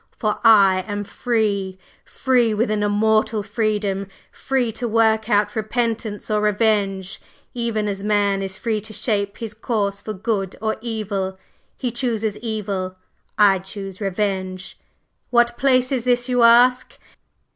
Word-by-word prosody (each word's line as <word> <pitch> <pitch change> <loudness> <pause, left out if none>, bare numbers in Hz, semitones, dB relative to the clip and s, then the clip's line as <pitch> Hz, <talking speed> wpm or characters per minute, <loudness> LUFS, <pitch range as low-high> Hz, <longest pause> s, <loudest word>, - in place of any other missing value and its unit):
For 215 -2 -1
I 195 -4 +6
am 205 0 -3
free! 200 -4 -1 0.3
free 245 -4 +1
with 215 +1 0
an 210 -1 0
immortal 215 +1 +1
freedom 205 -2 -1 0.2
free 260 -4 -1
to 240 +2 -4
work 220 0 +2
out 205 -1 +2
repentance 220 -1 -2
or 210 0 +2
revenge, 205 -3 0 0.3
even 230 -3 -1
as 195 -1 -4
Man 205 -2 +1
is 190 0 -4
free 220 -2 -2
to 215 +1 -9
shape 200 -3 -1
his 225 -3 -6
course 210 -3 -2
for 215 - -5
good 195 -2 -2
or 220 0 -1
evil. 205 -5 -3 0.4
He 250 - -2
chooses 225 -4 -2
evil; 200 -5 -3 0.4
I 200 -3 +5
choose 195 +1 -8
revenge! 190 -2 -3 0.5
What 240 0 +3
place 255 -1 +2
is 255 -3 -1
this, 245 0 +2
you 250 -1 +1
ask?" 245 +2 +5
215 Hz, 140 wpm, -21 LUFS, 200-230 Hz, 0.5 s, I